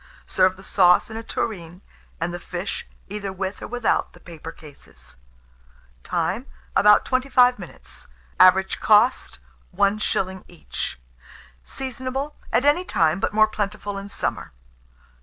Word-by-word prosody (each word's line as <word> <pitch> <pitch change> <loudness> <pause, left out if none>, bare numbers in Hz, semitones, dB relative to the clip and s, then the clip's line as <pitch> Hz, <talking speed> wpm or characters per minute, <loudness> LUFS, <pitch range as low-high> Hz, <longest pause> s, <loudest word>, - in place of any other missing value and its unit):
Serve 185 0 +2
the 190 - -14
sauce 180 +1 +4
in - - -7
a - - -4
tureen, 180 -6 -5 0.4
and 170 +1 -2
the 175 - -5
fish, 180 +2 -5 0.2
either 200 -1 -5
with 190 +1 -5
or - - -6
without 245 0 0
the - - -16
paper 165 -1 -10
cases. 65 - -14 0.9
Time. - - -2 0.3
About 210 0 +6
25 255 -1 +3
minutes. - - -12 0.3
Average 190 +1 +5
cost, 220 - +3 0.4
1s. 195 -2 0
each. 165 - -6 0.6
Seasonable 265 - -5 0.2
at 260 - +2
any 295 +5 +4
time, 165 - +1
but - - -1
more 215 +1 +4
plentiful 205 -1 -4
in 200 +1 -9
summer. 200 - -4
200 Hz, 130 wpm, -23 LUFS, 180-225 Hz, 0.9 s, About